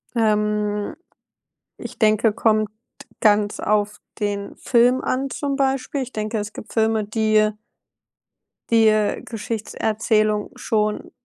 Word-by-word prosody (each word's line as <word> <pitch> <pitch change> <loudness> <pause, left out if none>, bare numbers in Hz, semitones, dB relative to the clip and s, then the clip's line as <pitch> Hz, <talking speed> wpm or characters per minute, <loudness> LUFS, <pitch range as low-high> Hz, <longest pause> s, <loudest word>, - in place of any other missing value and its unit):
Ähm, 210 -2 0 0.8
ich - - -9
denke, 215 0 +3
kommt 215 -1 +2 0.5
ganz 210 -1 +3
auf 210 0 0 0.2
den 205 -1 -3
Film 245 +1 +3
an, 270 +2 -1
zum 280 0 -2
Beispiel. 270 0 0
Ich 255 -1 -5
denke, 215 0 -3
es 210 +1 -5
gibt - - -10
Filme, 220 -1 +1
die, 215 0 +1
äh 215 0 +4 1.2
die, 225 -1 +5
äh, 215 -1 +2
Geschichtserzählung 215 -1 -1
schon 210 -1 -1
215 Hz, 115 wpm, -22 LUFS, 210-230 Hz, 1.2 s, die